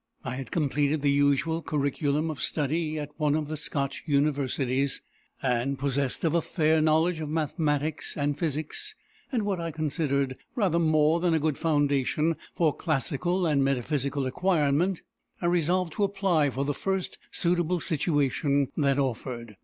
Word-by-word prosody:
I 130 - -3
had 135 - -6
completed 145 -1 0
the 140 - +4
usual 145 +4 +2
curriculum 150 +1 0
of 150 - -7
study 155 +1 -1
at 150 -1 -5
one 150 -2 +2
of 155 -1 -1
the 155 - -2
Scotch 140 -2 -2
universities; 140 -2 +1 0.4
and, 130 +1 0
possessed 140 -1 -1
of 165 -2 +2
a 170 - +3
fair 160 -1 +2
knowledge 160 +2 +2
of 155 -2 -4
mathematics 155 -1 -1
and 145 0 0
physics, 165 - -2 0.4
and 240 -5 0
what 200 -3 -1
I 165 - -2
considered 145 -4 -1 0.2
rather 185 -8 +2
more 155 0 +3
than 170 -1 +2
a - - +2
good 155 -2 -1
foundation 150 0 +1 0.2
for 160 -4 +2
classical 170 +5 -1
and 145 -4 +2
metaphysical 140 +1 0
acquirement, 170 +3 +1 0.4
I - - -4
resolved 175 0 +1
to 205 - 0
apply 195 -7 +2
for 135 +2 -2
the 145 - 0
first 190 +5 -2
suitable 175 0 +2
situation 145 -3 +1
that 140 -3 +2
offered. 120 -4 -3
150 Hz, 155 wpm, -27 LUFS, 140-165 Hz, 0.4 s, the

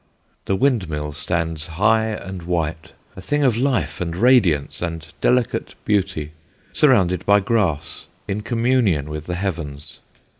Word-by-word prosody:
The 95 - +1
windmill 90 - 0
stands 80 -1 -2
high 105 +7 +2
and 95 -4 -5
white, 85 -2 -2 0.3
a 95 - -9
thing 145 +10 0
of 125 -5 +3
life 120 - 0
and 85 -1 -2
radiance 100 - +3
and 85 -2 -4 0.2
delicate 125 -2 +1
beauty, 95 -7 0 0.4
surrounded 95 - +3
by 100 0 +5
grass, 95 -8 -1 0.2
in 100 +2 -2
communion 115 - +1
with 75 0 -6
the 90 - -2
heavens. 80 -6 -5
95 Hz, 135 wpm, -21 LUFS, 80-110 Hz, 0.4 s, by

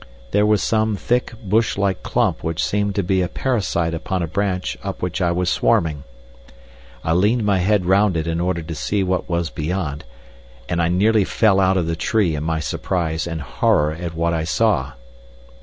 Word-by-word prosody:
There 105 +1 +3
was 105 -4 +2
some 110 -1 +1
thick, 120 +4 -1
bush 105 +2 +1
like 100 -2 0
clump - - 0
which 80 0 -1
seemed 100 -1 -1
to 100 - +1
be 95 +1 +1
a 90 - 0
parasite 90 -6 -1
upon 90 +2 -2
a - - -2
branch 95 -4 -2
up - - -4
which 90 +1 -2
I 85 -1 +2
was 90 +1 -1
swarming. 75 -4 +1 1.0
I 80 - +1
leaned 105 +7 +2
my 100 -2 +2
head 95 0 +2
round 95 0 +3
it 80 - -1
in 85 0 -1
order 90 -2 -1
to 80 +1 -6
see 95 +8 -1
what 90 0 -1
was 85 -2 -1
beyond, 75 -2 -3 0.6
and 85 0 0
I 85 - +2
nearly 105 +4 +3
fell 100 0 +2
out 95 0 +3
of 90 - +1
the 85 0 -1
tree 95 0 +1
in 75 - -3
my 80 0 -1
surprise 80 0 -2
and 80 -2 -4
horror 75 +4 +1
at 85 0 -6
what 85 +1 0
I 80 -1 -1
saw. 80 - +1
90 Hz, 195 wpm, -21 LUFS, 80-100 Hz, 1.0 s, There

